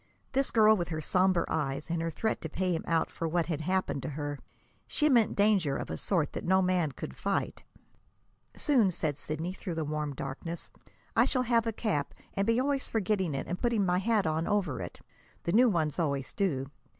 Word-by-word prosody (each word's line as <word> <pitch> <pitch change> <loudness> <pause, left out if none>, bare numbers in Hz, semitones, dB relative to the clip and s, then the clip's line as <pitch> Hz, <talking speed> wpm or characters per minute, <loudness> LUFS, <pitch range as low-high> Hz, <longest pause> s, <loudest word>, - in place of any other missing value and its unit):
This 275 0 +1
girl 220 -1 +6
with 175 -4 -2
her 155 -2 -2
somber 180 +2 +2
eyes 150 +1 -2
and 170 -1 0
her 165 - -1
threat 220 +7 -2
to - - -4
pay 185 -1 0
him 160 - -3
out 165 -1 +1
for 165 - -3
what 170 +1 +1
had 160 -3 -2
happened 185 -4 0
to - - -4
her 145 -1 -4 0.5
she 305 -1 +2
meant 235 -5 +4
danger 200 -9 +3
of - - -5
a - - -2
sort 165 -7 0
that - - -4
no 190 +1 +4
man 180 -5 +2
could - - -7
fight. - - -2 0.9
"Soon," 250 -9 +3
said 155 -4 -1
Sidney, 155 +5 -3
through 180 -2 -5
the 160 -1 -1
warm 150 -1 -3
darkness, 140 +6 -5 0.4
"I - - +5
shall 255 -2 +1
have 230 -1 +2
a - - +1
cap, 205 -10 -2 0.2
and 195 +1 0
be 230 +1 +3
always 275 0 0
forgetting 190 -7 0
it - - -3
and 175 - -4
putting 235 -5 +2
my 180 0 +2
hat 210 0 +2
on 160 +1 0
over 195 - 0
it 90 - -8 0.4
the 170 - -1
new 245 +5 +6
ones 160 -4 0
always 140 -5 -1
do. 140 -9 -1
175 Hz, 210 wpm, -30 LUFS, 155-210 Hz, 0.9 s, girl